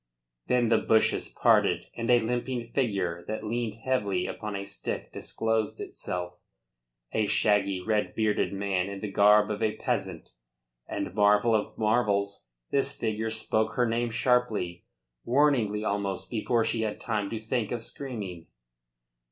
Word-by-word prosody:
Then 120 -2 +2
the 115 - +4
bushes 110 -1 +2
parted - - +3
and 115 +1 -3
a 120 -1 +6
limping 120 0 -2
figure 95 -10 0
that 110 0 -4
leaned 115 0 -2
heavily 100 -8 0
upon 105 +2 -5
a 100 0 -4
stick 100 0 -5
disclosed 110 -1 -1
itself; 90 0 -5 0.7
a 110 -1 +1
shaggy, 100 -2 +2
red 105 +2 0
bearded 110 -1 +1
man 100 -1 -1
in 100 -1 -6
the 105 - -4
garb 105 +1 +5
of 105 - -3
a 110 -1 +1
peasant; - - -3 0.6
and - - -4
marvel 105 +2 +4
of 110 -1 0
marvels! 105 - +1 0.2
this 140 - +1
figure 110 0 -1
spoke 110 0 0
her 125 -1 +2
name 115 +1 0
sharply, 115 -7 0 0.4
warningly 120 -6 +2
almost, 100 -2 -2
before 115 0 +1
she 115 0 0
had 110 -1 -2
time 105 -4 -2
to 115 - -3
think 110 0 -2
of 120 -2 -3
screaming. 105 -12 -6
110 Hz, 145 wpm, -28 LUFS, 100-115 Hz, 0.7 s, a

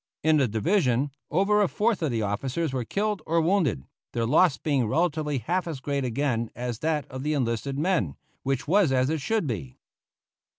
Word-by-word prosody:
In 155 0 +4
the 135 -3 +3
division 135 - +1 0.2
over 200 +6 +3
a 200 - +4
fourth 210 +1 0
of 160 - +1
the 115 -3 -1
officers 130 +9 -2
were 130 -2 -1
killed 205 - -1
or 165 +1 +2
wounded, 165 - +1 0.3
their 115 -1 0
loss 150 +3 +4
being 140 -7 0
relatively 155 +1 0
half 175 +10 -1
as 155 -5 -4
great 140 +1 -2
again 120 -2 -1
as 120 -2 -4
that 155 -2 0
of 130 0 -5
the 150 +2 0
enlisted 130 +1 -1
men 150 - 0 0.3
which 135 +1 -2
was 185 -2 +4
as 130 +2 +2
it 160 -2 -1
should 220 +6 0
be. 100 - -5
145 Hz, 185 wpm, -26 LUFS, 125-170 Hz, 0.3 s, In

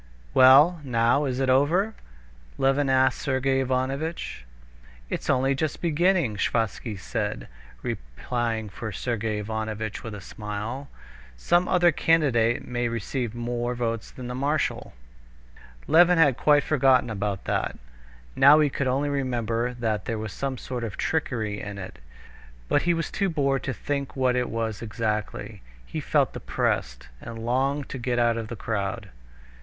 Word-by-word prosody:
"Well, 145 +6 +7
now 120 +2 +2
is 130 -2 -2
it 135 - +1
over?" 160 +11 +3 0.6
Levin 135 +1 +2
asked 130 0 +3
Sergey 135 0 +1
Ivanovitch. 135 - -2 0.7
"It's - - -3
only 135 +2 +3
just 150 +2 -2
beginning," 170 - +2
Sviazhsky 110 0 -1
said, 105 - -3 0.4
replying 110 - -3
for 110 +3 -6
Sergey 110 +1 -2
Ivanovitch 110 0 -4
with 110 -2 -6
a - - -7
smile. 105 +7 -6 0.5
"Some 175 - +2
other 175 -1 +4
candidate 135 -8 +2
may 120 -1 -1
receive 115 +1 -3
more 120 +1 -2
votes 115 -2 -2
than 125 -1 -8
the 125 - -4
marshal." 145 +4 -1 0.9
Levin 175 +2 +6
had 145 -6 +5
quite 145 +2 +4
forgotten 130 -5 +3
about 100 -2 -3
that. - - -1 0.6
Now 145 +3 +7
he 150 -2 +3
could 140 - -1
only 135 +3 +1
remember 125 -3 -1
that 110 -4 -2
there 115 - -2
was 110 -3 -5
some 135 -1 -3
sort 125 0 -5
of 110 -3 -5
trickery 110 -10 -1
in 105 -1 -6
it, 95 - -8 0.7
but - - +2
he 175 0 +2
was 165 -2 -3
too 195 -2 0
bored 140 -4 +1
to 135 - -1
think 140 +2 -3
what 130 -2 +2
it 125 -1 0
was 115 -2 -3
exactly. 110 -2 -3 0.2
He - - -5
felt - - +1
depressed, - - -2
and 115 -1 -7
longed 135 +3 0
to 130 - -5
get 120 0 -1
out 120 -1 +3
of 115 -1 -4
the 120 - -6
crowd. 100 -2 -3
125 Hz, 150 wpm, -26 LUFS, 110-140 Hz, 0.9 s, Well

